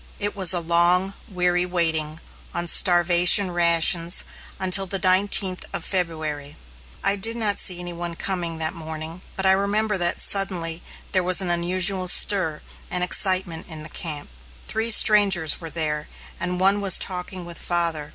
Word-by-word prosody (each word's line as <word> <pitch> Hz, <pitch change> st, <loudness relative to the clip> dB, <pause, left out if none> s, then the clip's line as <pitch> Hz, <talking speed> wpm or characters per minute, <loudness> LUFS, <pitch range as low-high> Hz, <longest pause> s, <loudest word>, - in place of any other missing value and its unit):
It 205 Hz, 0 st, -4 dB
was 190 Hz, -3 st, +4 dB
a 180 Hz, -, +3 dB
long, 175 Hz, +3 st, 0 dB, 0.2 s
weary 180 Hz, -2 st, -1 dB
waiting, 160 Hz, -3 st, 0 dB, 0.4 s
on 175 Hz, 0 st, -1 dB
starvation 175 Hz, +2 st, +4 dB
rations 170 Hz, 0 st, +3 dB, 0.4 s
until 190 Hz, +1 st, +1 dB
the 195 Hz, -, -3 dB
nineteenth 185 Hz, 0 st, +1 dB
of -, -, -6 dB
February. 155 Hz, -5 st, -4 dB, 0.5 s
I 200 Hz, -, +1 dB
did 225 Hz, +4 st, -3 dB
not 210 Hz, -3 st, -1 dB
see 180 Hz, -, +2 dB
any 175 Hz, 0 st, -7 dB
one 170 Hz, 0 st, -7 dB
coming 170 Hz, -3 st, -4 dB
that 160 Hz, +1 st, -1 dB
morning; 160 Hz, 0 st, -9 dB
but 190 Hz, -, -4 dB
I 190 Hz, -, +4 dB
remember 200 Hz, +1 st, -1 dB
that, 175 Hz, 0 st, 0 dB
suddenly, 175 Hz, -4 st, +2 dB, 0.3 s
there 185 Hz, -, +1 dB
was 180 Hz, 0 st, -1 dB
an 185 Hz, -3 st, -1 dB
unusual 185 Hz, +2 st, 0 dB
stir 175 Hz, -4 st, +3 dB, 0.3 s
and 180 Hz, 0 st, -1 dB
excitement 180 Hz, -3 st, 0 dB
in 155 Hz, -2 st, -9 dB
the 155 Hz, -, -10 dB
camp. 150 Hz, -, -6 dB, 0.4 s
Three 225 Hz, +1 st, -3 dB
strangers 200 Hz, -8 st, +4 dB
were 165 Hz, -, -8 dB
there, 150 Hz, -2 st, -3 dB, 0.3 s
and 180 Hz, +1 st, -4 dB
one 195 Hz, +2 st, +1 dB
was 195 Hz, -2 st, +4 dB
talking 180 Hz, -1 st, -4 dB
with 170 Hz, -1 st, -10 dB
father. 165 Hz, -4 st, -3 dB
180 Hz, 160 wpm, -21 LUFS, 165-190 Hz, 0.5 s, was